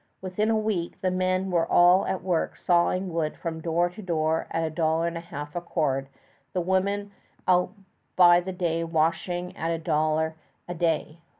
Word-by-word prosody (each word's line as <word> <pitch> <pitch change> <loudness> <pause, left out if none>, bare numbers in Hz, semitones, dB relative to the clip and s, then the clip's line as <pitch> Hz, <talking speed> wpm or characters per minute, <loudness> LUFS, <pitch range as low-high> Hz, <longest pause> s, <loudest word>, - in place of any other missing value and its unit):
Within 190 +4 -1
a 225 - +3
week, 210 -6 -2
the 185 - +1
men 185 +1 0
were 170 -2 +1
all 175 +2 +5
at 190 - -2
work 180 -3 0
sawing 180 +1 +1
wood 160 -2 -1
from 165 -2 -5
door 170 +1 +1
to 205 +4 -10
door 160 -3 0
at 165 - -1
a 160 - -2
dollar 160 +1 +1
and 170 0 -2
a - - -3
half 150 -3 -8
a 175 - -2
cord 140 -6 -1 0.5
the 180 - 0
women 200 +3 0 0.4
out 180 -1 +3 0.4
by 175 -1 +7
the 185 +2 -5
day 170 -2 -1
washing 170 +3 -1
at 165 - -3
a 165 - 0
dollar 155 0 0 0.3
a 175 - -4
day. 165 -1 -1
175 Hz, 185 wpm, -26 LUFS, 160-185 Hz, 0.5 s, by